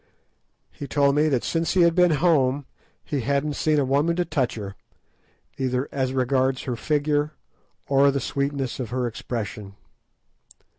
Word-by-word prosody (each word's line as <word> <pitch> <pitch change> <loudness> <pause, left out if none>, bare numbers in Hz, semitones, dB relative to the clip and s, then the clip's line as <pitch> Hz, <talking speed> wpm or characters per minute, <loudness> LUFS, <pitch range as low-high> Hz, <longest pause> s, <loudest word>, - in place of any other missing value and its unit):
He 145 - -8
told 140 -1 +2
me 150 +2 +3
that 130 -5 0
since 165 0 0
he 185 - +3
had 170 -1 +5
been 180 0 +4
home 145 -4 +2 0.4
he 145 - -2
hadn't 140 +4 0
seen 155 +1 +1
a 140 - +2
woman 145 +6 +1
to 175 0 0
touch 140 -7 -1
her, 100 -3 -7 0.8
either 130 0 -1
as 130 -2 -1
regards 130 0 +1
her 125 - -3
figure 150 +3 0 0.5
or 140 +1 +4
the 140 0 0
sweetness 140 0 -2
of 125 -4 -4
her 125 +1 -1
expression. 105 -4 -5
140 Hz, 155 wpm, -24 LUFS, 130-150 Hz, 0.8 s, had